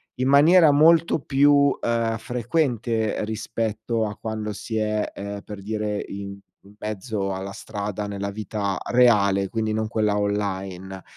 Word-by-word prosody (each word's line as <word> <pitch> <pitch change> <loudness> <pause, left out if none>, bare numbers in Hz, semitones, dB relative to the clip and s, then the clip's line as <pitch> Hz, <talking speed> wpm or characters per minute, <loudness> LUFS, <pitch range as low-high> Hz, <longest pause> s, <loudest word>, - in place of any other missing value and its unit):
in 130 +1 -1
maniera 155 +3 +6
molto 160 +2 +4
più, 140 +1 +4
ehm, 115 -1 0
frequente 120 -3 -1
rispetto 110 +1 -2
a 105 -1 -5
quando 110 -1 -4
si 105 +2 -6
è, 105 -1 0
ehm, 100 0 -6
per 105 -2 -8
dire 105 0 -3
in 100 0 -6 0.3
in 100 +1 -17
mezzo 105 -2 -3
alla 95 +1 -5
strada 105 0 -5
nella 100 0 -4
vita 105 -2 -3
reale, 100 -6 +4
quindi 110 -1 -1
non 110 0 -1
quella 105 -2 +1
online, 95 -2 -3
110 Hz, 140 wpm, -24 LUFS, 100-115 Hz, 0.3 s, maniera